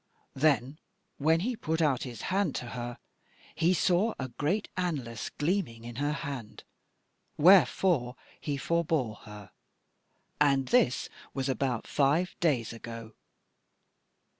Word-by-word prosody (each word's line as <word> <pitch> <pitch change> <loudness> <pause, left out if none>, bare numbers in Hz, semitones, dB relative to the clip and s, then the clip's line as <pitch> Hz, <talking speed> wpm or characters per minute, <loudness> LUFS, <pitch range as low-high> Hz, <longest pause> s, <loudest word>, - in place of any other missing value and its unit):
"Then 140 0 +1 0.4
when 160 +3 +3
he 245 +5 -1
put 160 -8 -2
out 145 -6 +2
his 120 -4 -6
hand 200 0 +1
to 120 - -4
her, 120 -1 -5 0.6
he 170 +1 +2
saw 185 +5 +2
a 130 -1 -4
great 150 - -1
anlace 140 -11 -3
gleaming 150 - -1
in 120 0 -8
her 145 +2 0
hand, 140 -7 -6 0.7
wherefore 155 -5 +5 0.2
he 145 -2 -3
forbore 155 -9 0
her; 105 -3 -11 0.9
and 140 -3 +3
this 185 - +3 0.3
was 135 -1 -1
but 130 -4 -2
five 150 +6 +1
days 130 -10 +1
ago. 115 -1 -8
140 Hz, 120 wpm, -29 LUFS, 120-170 Hz, 0.9 s, wherefore